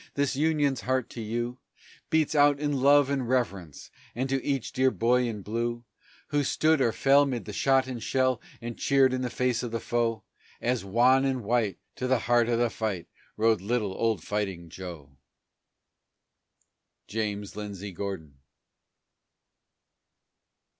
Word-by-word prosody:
this 140 -1 0
Union's 145 -4 +1
heart 130 -1 -1
to 120 - -6
you 120 +3 -3 0.5
Beats 160 -1 +2
out 145 -1 +4
in 145 -3 -1
love 140 0 +6
and 130 -4 -1
reverence 100 - -2 0.2
and 130 +3 -1
to 135 0 0
each 135 -4 -2
dear 130 +1 +3
boy 125 0 +2
in 105 -4 -5
blue 120 +3 -3 0.4
Who 145 -1 +1
stood 155 +2 +2
or 120 -3 +3
fell 140 +4 +4
'mid 125 -4 -3
the 105 - -7
shot 135 +3 +3
and 125 -3 -6
shell, 130 0 +1 0.2
and 120 0 -5
cheered 135 -2 +3
in 130 - -1
the 125 - -2
face 125 -1 0
of 120 - -4
the 115 0 -3
foe, 115 -2 -1 0.4
As, 125 -2 -1
wan 125 +7 +4
and 130 -3 -1
white, 110 -4 0 0.2
to 130 - -2
the 130 0 +3
heart 120 0 +3
of 120 - +2
the 120 -1 +1
fight 105 -6 -3 0.3
rode 110 -2 +3
little 105 -1 -1
old 110 -4 0
Fighting 95 -5 -3
Joe! 80 -7 -9 1.9
JAMES 105 -2 -3
LINDSAY 100 -1 -6
GORDON. 85 -7 -6
120 Hz, 155 wpm, -27 LUFS, 105-130 Hz, 1.9 s, love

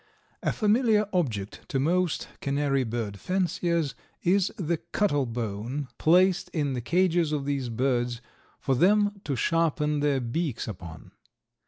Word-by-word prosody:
A - - +1
familiar 215 -1 +3
object 115 - -1
to 135 - 0
most 175 +4 +1
canary 140 -1 +1
bird 110 -4 -4
fanciers 170 -5 0 0.3
is 190 +2 +3
the 170 -4 -1
cuttle 145 - 0
bone 120 +4 -4
placed 180 +3 +4
in 145 -4 0
the 125 - -2
cages 170 +2 +2
of 145 -2 -1
these 140 -3 -1
birds 120 0 0 0.4
for 135 - 0
them 205 +7 +3
to 140 - -1
sharpen 150 +1 +1
their 145 -2 +2
beaks 130 +2 -2
upon. 85 -6 -9
145 Hz, 135 wpm, -27 LUFS, 125-180 Hz, 0.4 s, placed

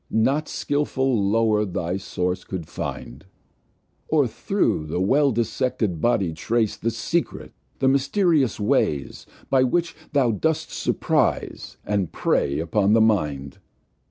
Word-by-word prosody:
Not 135 +7 +1
skilful 130 -7 0
Lower 110 -1 +2
thy 90 -2 -2
Source 90 -1 -3
cou'd 90 -4 -6
find, - - -6 0.8
Or - - +3
thro' - - 0
the 75 +3 -3
well 135 +9 +3
dissected 115 -6 -1
Body 100 -8 +1
trace 110 +6 0
The 115 - -2
secret, 165 +9 -3 0.2
the 135 - +1
mysterious 140 - +2
ways, 75 -8 0 0.2
By 135 - +4
which 165 +7 0 0.2
thou 135 -5 +3
dost 160 +9 -1
surprize, - - -1
and 100 -5 -1
prey 70 - 0
upon 100 +5 +1
the 115 - +5
Mind. 75 -11 0
110 Hz, 125 wpm, -23 LUFS, 90-135 Hz, 0.8 s, the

